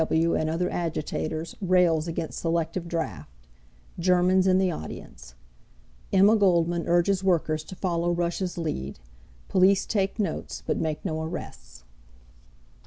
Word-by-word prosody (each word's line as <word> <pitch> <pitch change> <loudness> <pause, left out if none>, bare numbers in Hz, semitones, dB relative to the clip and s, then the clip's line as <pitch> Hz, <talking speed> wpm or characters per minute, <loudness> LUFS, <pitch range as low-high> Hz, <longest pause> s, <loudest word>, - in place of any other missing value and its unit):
W. 160 +1 +2
W. - - +1
and 155 - -1
Other 170 +3 0
Agitators 160 -1 -3
Rails 180 -4 +3
Against 165 -1 -4
Selective 165 +1 -1
Draft. 160 - -4 0.7
GERMANS 185 +1 +3
IN 185 0 +4
THE 190 -1 +2
AUDIENCE - - -9 0.8
Emma 200 +3 +6
Goldman 175 -4 +2
Urges 180 +3 +2
Workers 160 -4 +1
to 185 - -9
Follow 175 -2 -1
Russia's 175 +1 -2
Lead 70 - -3 0.5
Police 190 +1 +4
Take 195 -2 -1
Notes, 210 -3 -3
but - - 0
Make 155 -2 -3
No 160 0 -2
Arrests. 160 - -7
170 Hz, 130 wpm, -26 LUFS, 160-185 Hz, 0.8 s, Emma